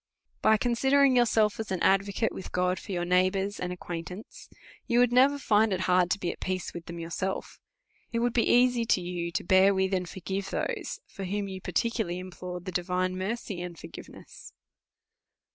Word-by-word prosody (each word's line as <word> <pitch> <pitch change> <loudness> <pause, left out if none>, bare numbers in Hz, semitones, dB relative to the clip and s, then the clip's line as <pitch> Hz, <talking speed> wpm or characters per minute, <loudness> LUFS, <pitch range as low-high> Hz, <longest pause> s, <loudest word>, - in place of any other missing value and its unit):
By 220 - +5
considering 265 +3 +3
yourself 225 -4 +3
as 220 -3 -4
an 185 - -1
advocate 200 +3 +2
with 190 - -8
God 180 0 0
for - - -9
your 175 -2 -1
neighbours 185 +3 +1
and 180 0 -3
acquaintance, 180 +3 -8 0.4
you 240 - +1
would 245 -1 +5
never 270 +3 +5
find 220 -5 +3
it 185 -1 -1
hard 180 -1 +3
to 200 - +1
be 175 -3 -1
at - - -11
peace 185 -1 -3
with 170 -1 -8
them 170 - -7
yourself. 170 +3 -4 0.5
It 230 - -1
would 240 0 +1
be 235 - +2
easy 245 -1 +4
to 225 - +2
you 175 -1 -4
to 160 - -2
bear 190 +2 +5
with, 190 0 +1
and 180 -2 -1
forgive 195 +1 -4
those, - - -3
for 195 - -9
whom 200 +2 -2
you 190 -1 -7
particularly 205 -1 -1
implored 180 -1 -7
the 185 - -4
divine 180 +1 -1
mercy 195 0 -4
and 175 -1 -6
forgiveness. - - -12
190 Hz, 185 wpm, -28 LUFS, 180-220 Hz, 0.5 s, By